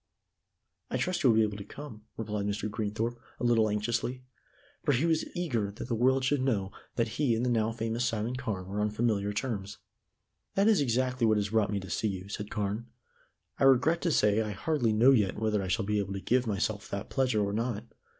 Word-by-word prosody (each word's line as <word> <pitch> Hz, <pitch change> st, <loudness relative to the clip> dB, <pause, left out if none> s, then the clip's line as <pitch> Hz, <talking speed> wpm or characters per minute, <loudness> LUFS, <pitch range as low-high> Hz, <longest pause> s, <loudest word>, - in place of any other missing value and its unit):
"I -, -, -1 dB
trust 185 Hz, -1 st, -1 dB
you 130 Hz, -, +5 dB
will 110 Hz, -, +4 dB
be 110 Hz, -, +6 dB
able 105 Hz, -1 st, -2 dB
to 100 Hz, -, -6 dB
come," 110 Hz, -1 st, -10 dB
replied 105 Hz, -2 st, -2 dB
Mr. 105 Hz, +1 st, -2 dB
Greenthorpe 110 Hz, +3 st, -2 dB, 0.2 s
a -, -, -5 dB
little 115 Hz, -3 st, +4 dB
anxiously, 120 Hz, +4 st, -1 dB, 0.6 s
for 145 Hz, -, +3 dB
he 135 Hz, +6 st, +2 dB
was 165 Hz, -1 st, +2 dB
eager 125 Hz, -, -1 dB
that 100 Hz, -, -7 dB
the 120 Hz, -, -1 dB
world 130 Hz, +3 st, +3 dB
should 140 Hz, 0 st, +2 dB
know 105 Hz, -7 st, 0 dB, 0.2 s
that 115 Hz, -1 st, +1 dB
he 135 Hz, -6 st, +3 dB
and 115 Hz, +2 st, 0 dB
the 125 Hz, -, +1 dB
now 110 Hz, -1 st, +2 dB
famous 115 Hz, +1 st, -2 dB
Simon 115 Hz, +1 st, -1 dB
Carne 110 Hz, -8 st, -3 dB
were 100 Hz, +3 st, -3 dB
on 105 Hz, -, +2 dB
familiar 105 Hz, -2 st, 0 dB
terms. 105 Hz, -3 st, -3 dB, 0.8 s
"That 195 Hz, +2 st, +4 dB
is 215 Hz, -8 st, +5 dB
exactly 125 Hz, -1 st, +1 dB
what 110 Hz, -1 st, +4 dB
has 105 Hz, -1 st, 0 dB
brought 110 Hz, -1 st, +2 dB
me 100 Hz, -, 0 dB
to 95 Hz, -, -9 dB
see 110 Hz, -, 0 dB
you," 95 Hz, -1 st, -5 dB
said 105 Hz, 0 st, -5 dB
Carne. 105 Hz, +2 st, -2 dB, 0.7 s
"I -, -, +4 dB
regret 140 Hz, +6 st, +4 dB
to 170 Hz, -, +1 dB
say 105 Hz, -5 st, +3 dB
I 105 Hz, -1 st, -3 dB
hardly 120 Hz, +1 st, 0 dB
know 115 Hz, +5 st, +6 dB
yet 105 Hz, -8 st, +2 dB
whether 110 Hz, -2 st, +1 dB
I 95 Hz, -, -3 dB
shall 95 Hz, +3 st, 0 dB
be 105 Hz, +1 st, +1 dB
able 100 Hz, -1 st, -2 dB
to 95 Hz, -, -3 dB
give 125 Hz, +6 st, +1 dB
myself 100 Hz, 0 st, -1 dB
that 100 Hz, 0 st, -5 dB
pleasure 130 Hz, -6 st, +2 dB
or 100 Hz, -, -2 dB
not. 115 Hz, -1 st, -1 dB
110 Hz, 220 wpm, -30 LUFS, 105-125 Hz, 0.8 s, be